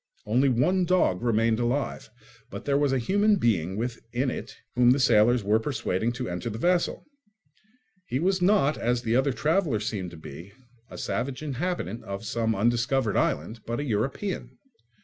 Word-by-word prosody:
Only 125 +6 +3
one 180 +10 +2
dog 175 - +2
remained 115 -1 +2
alive; 120 0 -2 0.4
but - - -8
there 140 - +1
was 145 -1 +2
a 135 - +2
human 205 - +3
being 100 - 0
within 120 +2 -2
it - - -7 0.2
whom 120 0 +4
the 130 +3 +4
sailors 120 -2 +4
were 105 +2 +3
persuading 115 -4 -1
to 125 -1 -4
enter 90 +7 -4
the 110 - -5
vessel. 175 +7 0 1.0
He 125 - -1
was 185 +3 +1
not, 180 -6 +3
as 120 +1 0
the 115 +1 +1
other 135 +2 +3
traveller 155 - +1
seemed 105 -4 -3
to 85 - -12
be, 80 +5 -10 0.4
a - - -9
savage 135 +3 -3
inhabitant 145 - -3
of 100 +2 -6
some 115 0 0
undiscovered 120 +2 +1
island, 95 +10 0
but 120 +2 -2
a - - -2
European. 135 - -3
120 Hz, 170 wpm, -26 LUFS, 110-145 Hz, 1.0 s, whom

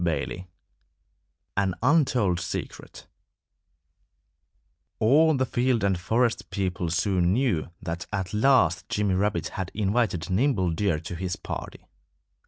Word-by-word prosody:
XXI 85 +3 -2 1.1
AN 95 -2 +1
UNTOLD 125 - +3
SECRET 85 - -6 1.9
All 150 +6 +4
the 130 - +1
field 120 -3 0
and 95 -3 +1
forest 115 +5 0
people 90 -3 -2
soon 90 +1 +1
knew 115 - 0
that 85 +1 -4
at 95 -2 -3
last 105 - +3
Jimmy 105 -4 0
Rabbit 105 +3 0
had 95 -3 -5
invited 100 -4 0
Nimble 95 -4 +2
Deer 85 -2 0
to 85 +2 -7
his 90 +1 -3
party. - - -7
100 Hz, 115 wpm, -26 LUFS, 90-120 Hz, 1.9 s, All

